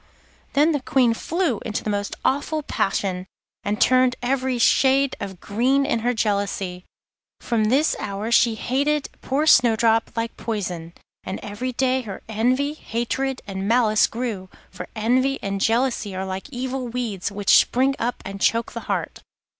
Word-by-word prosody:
Then 300 Hz, +4 st, +4 dB
the 290 Hz, -3 st, -1 dB
Queen 250 Hz, -3 st, +3 dB
flew 320 Hz, -, -1 dB
into 215 Hz, -3 st, -4 dB
the 215 Hz, -, -1 dB
most 205 Hz, 0 st, -2 dB
awful 295 Hz, +3 st, 0 dB
passion, 190 Hz, -6 st, -1 dB, 0.4 s
and 210 Hz, +1 st, -2 dB
turned 255 Hz, -1 st, +4 dB
every 260 Hz, 0 st, 0 dB
shade 270 Hz, +3 st, +3 dB
of 190 Hz, -3 st, -6 dB
green 255 Hz, +7 st, +1 dB
in 275 Hz, -5 st, 0 dB
her 240 Hz, +2 st, +1 dB
jealousy. 200 Hz, -5 st, -2 dB, 0.5 s
From 225 Hz, -3 st, 0 dB
this 270 Hz, +8 st, +2 dB
hour 205 Hz, +3 st, -4 dB
she 235 Hz, -1 st, +4 dB
hated 280 Hz, +6 st, 0 dB
poor 280 Hz, +4 st, 0 dB
Snowdrop 230 Hz, -5 st, +4 dB
like 230 Hz, 0 st, -3 dB
poison, 180 Hz, -7 st, -4 dB, 0.3 s
and 190 Hz, -, -5 dB
every 240 Hz, +5 st, -4 dB
day 260 Hz, +1 st, +1 dB
her 205 Hz, -6 st, -8 dB
envy, 250 Hz, +7 st, +1 dB
hatred, 265 Hz, 0 st, -3 dB
and 195 Hz, 0 st, -4 dB
malice 225 Hz, -2 st, +4 dB
grew, 225 Hz, -6 st, -4 dB, 0.2 s
for -, -, -8 dB
envy 255 Hz, +5 st, +1 dB
and 195 Hz, -1 st, -2 dB
jealousy 230 Hz, -3 st, +1 dB
are 190 Hz, +1 st, -3 dB
like 190 Hz, +6 st, -5 dB
evil 260 Hz, -1 st, -4 dB
weeds 225 Hz, -6 st, -3 dB
which 200 Hz, -1 st, +3 dB
spring 265 Hz, +2 st, +3 dB
up 240 Hz, +2 st, -2 dB
and 195 Hz, 0 st, -7 dB
choke 230 Hz, +1 st, +2 dB
the -, -, -5 dB
heart. -, -, -2 dB
235 Hz, 155 wpm, -23 LUFS, 205-260 Hz, 0.5 s, Then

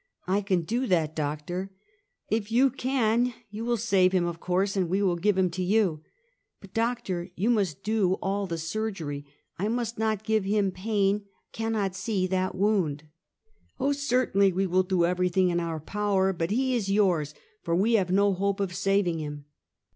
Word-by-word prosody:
" -, -, -58 dB
I 195 Hz, +3 st, +2 dB
can 190 Hz, -3 st, +1 dB
do 240 Hz, +9 st, -1 dB
that, 160 Hz, -4 st, +1 dB
doctor." 155 Hz, +5 st, -3 dB, 0.3 s
" 405 Hz, -, -42 dB
If 220 Hz, 0 st, -1 dB
you 260 Hz, +3 st, +4 dB
can 245 Hz, -2 st, +1 dB, 0.2 s
you 215 Hz, +2 st, -5 dB
will 240 Hz, 0 st, 0 dB
save 195 Hz, -4 st, +3 dB
him, 180 Hz, -2 st, +2 dB
of 170 Hz, -1 st, -4 dB
course, 190 Hz, +3 st, 0 dB
and 185 Hz, -3 st, 0 dB
we 195 Hz, +3 st, +1 dB
will 180 Hz, -3 st, +2 dB
give 195 Hz, +3 st, +1 dB
him 185 Hz, -2 st, +2 dB
to 180 Hz, +2 st, -4 dB
you." 185 Hz, -5 st, +1 dB, 0.6 s
"But, 195 Hz, -1 st, -15 dB
doctor, 225 Hz, -6 st, -1 dB
you 210 Hz, +7 st, +1 dB
must 195 Hz, -, 0 dB
do 210 Hz, -3 st, +2 dB
all 195 Hz, +1 st, -2 dB
the 170 Hz, -2 st, -3 dB
surgery. 165 Hz, -5 st, -4 dB, 0.3 s
I 200 Hz, -, 0 dB
must 235 Hz, 0 st, -2 dB
not 220 Hz, -2 st, 0 dB
give 220 Hz, -2 st, +1 dB
him 200 Hz, 0 st, +1 dB
pain; 200 Hz, +1 st, 0 dB, 0.3 s
cannot 220 Hz, -4 st, -2 dB
see 190 Hz, 0 st, -1 dB
that 185 Hz, 0 st, -1 dB
wound." 185 Hz, -8 st, +1 dB, 0.4 s
" 440 Hz, -1 st, -40 dB
Oh, 275 Hz, +2 st, +1 dB
certainly, 250 Hz, -8 st, +2 dB
we 190 Hz, +2 st, 0 dB
will 185 Hz, 0 st, +3 dB
do 185 Hz, -2 st, +1 dB
everything 180 Hz, +1 st, +2 dB
in 175 Hz, 0 st, +1 dB
our 165 Hz, -2 st, -3 dB
power; 195 Hz, +2 st, 0 dB
but 165 Hz, -1 st, -2 dB
he 260 Hz, +5 st, +1 dB
is 220 Hz, -5 st, -1 dB
yours, 175 Hz, -8 st, +2 dB, 0.3 s
for 170 Hz, -1 st, -1 dB
we 210 Hz, +6 st, +2 dB
have 195 Hz, -5 st, +2 dB
no 200 Hz, +2 st, +3 dB
hope 200 Hz, +1 st, -1 dB
of 195 Hz, -2 st, -1 dB
saving 195 Hz, -3 st, +1 dB
him." 145 Hz, -1 st, -6 dB
195 Hz, 190 wpm, -27 LUFS, 180-220 Hz, 0.6 s, you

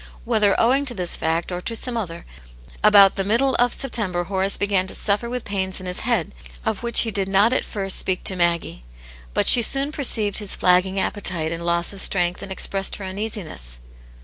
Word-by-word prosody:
Whether 205 Hz, -2 st, +2 dB
owing 265 Hz, +5 st, +2 dB
to 245 Hz, -3 st, -3 dB
this 180 Hz, -3 st, -2 dB
fact 165 Hz, +3 st, -2 dB
or 180 Hz, 0 st, -4 dB
to 230 Hz, -, -3 dB
some 245 Hz, +2 st, -3 dB
other, 170 Hz, -7 st, -5 dB, 0.6 s
about 205 Hz, -2 st, +6 dB
the 195 Hz, -, 0 dB
middle 235 Hz, +7 st, +1 dB
of 245 Hz, 0 st, +3 dB
September 210 Hz, -11 st, -2 dB
Horace 190 Hz, +2 st, -1 dB
began 195 Hz, -2 st, 0 dB
to -, -, -1 dB
suffer 210 Hz, +3 st, 0 dB
with 250 Hz, -1 st, -5 dB
pains 190 Hz, -2 st, -2 dB
in 185 Hz, -, -9 dB
his 180 Hz, 0 st, -4 dB
head, 230 Hz, -9 st, -1 dB, 0.3 s
of -, -, -2 dB
which 235 Hz, -1 st, +2 dB
he 225 Hz, -, -2 dB
did 195 Hz, -2 st, -1 dB
not 200 Hz, +5 st, +3 dB
at -, -, +1 dB
first 195 Hz, -3 st, -2 dB
speak 185 Hz, -1 st, -2 dB
to 190 Hz, -, +3 dB
Maggie. 170 Hz, -, -1 dB, 0.5 s
But -, -, +2 dB
she 240 Hz, -, +7 dB
soon 275 Hz, +5 st, +1 dB
perceived 220 Hz, -9 st, 0 dB
his 205 Hz, -2 st, -3 dB
flagging 185 Hz, +2 st, +2 dB
appetite 175 Hz, -6 st, -1 dB
and 170 Hz, 0 st, -5 dB
loss 170 Hz, +2 st, 0 dB
of 195 Hz, -, -4 dB
strength 180 Hz, -2 st, +1 dB
and 200 Hz, -1 st, -8 dB
expressed 195 Hz, 0 st, -2 dB
her 200 Hz, -, -7 dB
uneasiness. 185 Hz, -, -3 dB
195 Hz, 200 wpm, -22 LUFS, 180-225 Hz, 0.6 s, she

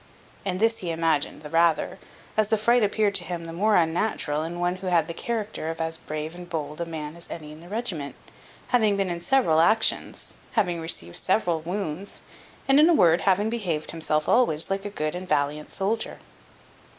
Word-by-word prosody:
And 185 Hz, -1 st, -1 dB
this 225 Hz, +1 st, +2 dB
he 175 Hz, -, -4 dB
imagined 160 Hz, -3 st, 0 dB
the 150 Hz, -, -7 dB
rather, 165 Hz, -1 st, +2 dB, 0.4 s
as 215 Hz, -1 st, +3 dB
the 220 Hz, +1 st, +2 dB
fright 235 Hz, +2 st, +3 dB
appeared 205 Hz, 0 st, +2 dB
to 190 Hz, -, +1 dB
him 170 Hz, 0 st, -5 dB
the 165 Hz, -, -7 dB
more 210 Hz, +5 st, +2 dB
unnatural 160 Hz, -3 st, +1 dB
in 170 Hz, +2 st, -4 dB
one 175 Hz, +1 st, 0 dB
who 185 Hz, 0 st, -6 dB
had 170 Hz, -3 st, +3 dB
the 170 Hz, -, -4 dB
character 215 Hz, -5 st, -3 dB
of 165 Hz, 0 st, -5 dB
as 160 Hz, 0 st, -2 dB
brave 155 Hz, +1 st, -5 dB
and 175 Hz, 0 st, -10 dB
bold 150 Hz, -1 st, -4 dB
a 170 Hz, -, -2 dB
man 155 Hz, -1 st, -6 dB
as 170 Hz, -, -8 dB
any 150 Hz, -2 st, -7 dB
in 155 Hz, -, -11 dB
the 170 Hz, +2 st, -13 dB
regiment, 195 Hz, -10 st, -3 dB, 0.5 s
having 215 Hz, -5 st, +3 dB
been 195 Hz, -2 st, 0 dB
in 170 Hz, 0 st, -4 dB
several 210 Hz, -9 st, +3 dB
actions, 220 Hz, +7 st, +2 dB, 0.2 s
having 180 Hz, -7 st, +1 dB
received 85 Hz, -, -1 dB
several 175 Hz, -5 st, +1 dB
wounds, 180 Hz, +1 st, -4 dB, 0.4 s
and, 275 Hz, +1 st, +6 dB
in 310 Hz, +3 st, +7 dB
a 340 Hz, -, +5 dB
word, 170 Hz, -, +5 dB
having 200 Hz, +4 st, +2 dB
behaved 175 Hz, -10 st, -2 dB
himself 155 Hz, -2 st, -1 dB
always 195 Hz, -10 st, +2 dB
like 195 Hz, +1 st, -1 dB
a -, -, -2 dB
good 155 Hz, -6 st, -2 dB
and 180 Hz, +1 st, -6 dB
valiant 145 Hz, 0 st, 0 dB
soldier. 215 Hz, +4 st, -1 dB
175 Hz, 200 wpm, -25 LUFS, 160-205 Hz, 0.5 s, in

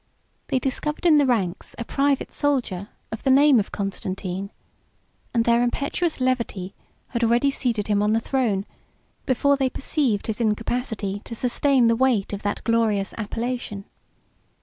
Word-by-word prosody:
They 270 Hz, -, +1 dB
discovered 285 Hz, +6 st, -2 dB
in 310 Hz, -3 st, +6 dB
the 285 Hz, -, +3 dB
ranks 195 Hz, -8 st, -1 dB
a 235 Hz, -, -4 dB
private 280 Hz, +1 st, 0 dB
soldier 245 Hz, -10 st, -1 dB, 0.2 s
of 220 Hz, -, -5 dB
the -, -, 0 dB
name 275 Hz, -1 st, +6 dB
of 205 Hz, -, -3 dB
Constantine, 195 Hz, -1 st, -4 dB, 0.8 s
and 230 Hz, -1 st, +1 dB
their 235 Hz, 0 st, +4 dB
impetuous 280 Hz, +7 st, -1 dB
levity 235 Hz, -7 st, -1 dB, 0.4 s
had 235 Hz, -1 st, -2 dB
already 240 Hz, +4 st, +3 dB
seated 235 Hz, -6 st, -1 dB
him 205 Hz, -1 st, +2 dB
on 210 Hz, +1 st, +2 dB
the 225 Hz, -, +3 dB
throne, 225 Hz, -6 st, 0 dB, 0.6 s
before 280 Hz, +2 st, +3 dB
they 265 Hz, -1 st, +1 dB
perceived 260 Hz, -6 st, -1 dB
his 220 Hz, +1 st, -3 dB
incapacity 215 Hz, -2 st, -1 dB
to 230 Hz, -, -7 dB
sustain 255 Hz, +2 st, +2 dB
the 230 Hz, 0 st, +4 dB
weight 235 Hz, -6 st, +1 dB
of 200 Hz, -, -4 dB
that 205 Hz, -, -2 dB
glorious 220 Hz, -4 st, +1 dB
appellation. 225 Hz, -2 st, -4 dB
235 Hz, 150 wpm, -24 LUFS, 205-265 Hz, 0.8 s, in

